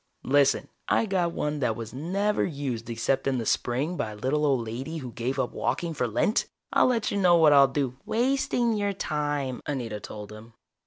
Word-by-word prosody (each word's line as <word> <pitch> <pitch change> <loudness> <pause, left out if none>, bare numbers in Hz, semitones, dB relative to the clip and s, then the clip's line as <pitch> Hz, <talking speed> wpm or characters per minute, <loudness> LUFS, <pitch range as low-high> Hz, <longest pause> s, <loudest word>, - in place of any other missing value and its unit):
Listen, 140 0 +3 0.2
I - - +2
got 185 -4 0
one 150 -2 -2
that 125 -5 0
was 115 0 -7
never 195 +9 0
used 135 -8 -3
except 135 +4 0
in 135 -1 +1
the 115 - -3
spring 135 +11 0
by 110 - -2
a - - -10
little 145 +7 0
old 130 -5 +1
lady 130 +9 -5
who 130 -5 -6
gave 125 +4 -3
up 130 -2 -1
walking 170 -2 -2
for 125 -5 -1
Lent. 120 - +1 0.3
I'll - - +5
tell 205 -2 -2
you 180 -3 +5
what 160 -3 +6
I'll 140 -1 +7
do 135 -2 -2
" - - -39
"Wasting 240 0 +1
your 205 -1 0
time," 145 -7 -2
Anita 120 -7 -3
told 105 0 -8
him. 110 +2 -12
140 Hz, 200 wpm, -27 LUFS, 120-170 Hz, 0.3 s, I'll